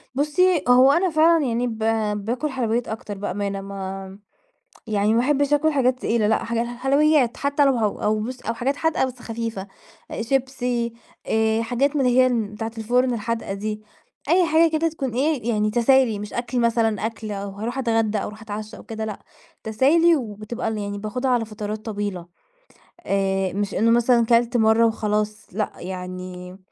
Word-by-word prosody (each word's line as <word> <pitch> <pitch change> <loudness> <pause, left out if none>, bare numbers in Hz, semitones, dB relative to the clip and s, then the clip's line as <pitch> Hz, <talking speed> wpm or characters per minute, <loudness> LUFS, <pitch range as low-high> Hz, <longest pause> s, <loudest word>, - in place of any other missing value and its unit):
بُصي، 315 +4 +2
هو 255 +2 +7
أنا 355 +4 +2
فعلًا 320 -1 +4
يعني 240 +1 0
ب 225 -2 -5 0.5
باكُل 250 +6 -2
حلويات 240 -2 -1
أكتر 215 -2 -6
بأمانة 200 0 -3
ما 195 0 -7 0.7
يعني 210 0 +1
ما 230 - +3
احبش 285 +2 +2
أكُل 310 +2 +3
حاجات 255 -2 +1
تقيلة 225 -2 +1
لأ 220 - +1
حاجات 235 0 -1
حلويات 270 +1 +2
حتى 285 0 +1
لو 270 - +4
هو 215 -2 -1
أو 215 0 +1
بُصي 245 +2 -6
أو - - +1
حاجات 260 +5 -1
حادقة 320 -4 +1
بس 255 -1 -8
خفيفة، 225 -4 -5 0.5
شيبسي 245 -2 -1 0.3
آآ، 220 0 +2
حاجات 265 +6 0
من 270 -3 +2
اللي 250 +1 +3
هي 255 - +4 0.2
بتاعة 225 +1 -4
الفُرن 245 +3 +1
الحادقة 230 -2 -3
دي، 210 +1 -4 0.5
أي 355 +1 +5
حاجة 325 +1 +4
كده 320 +1 +1
تكون 270 -7 -4
إيه 265 -3 0
يعني 215 -1 +1
تسالي 240 -2 +3
مش 210 0 -7
أكل 240 +1 -2
مثلًا 225 -2 +1
أكل 225 -1 -5
أو 200 0 -4
هاروح 225 +6 -5
اتغدى 225 -4 +1
أو - - -2
هاروح 215 +1 -9
أتعشى 215 0 -7
أو - - -12
كده، 220 -1 -5
لأ 210 -2 -6 0.4
تسالي 310 +10 +4
وبتبقى 225 -1 -5
يعني 205 0 -4
باخدها 250 +5 -2
على 235 -2 +1
فترات 215 0 -6
طويلة 205 -5 -4 0.8
آآ، 195 -1 0
مش 205 0 -2
إنه 230 +3 +3
مثلًا 235 0 +4
كَلَت 235 +1 +3
مرة 220 +1 +4
وخلاص، 210 -1 -1
لأ 210 +3 -2
يعني 180 0 -7
230 Hz, 170 wpm, -23 LUFS, 210-260 Hz, 0.8 s, هو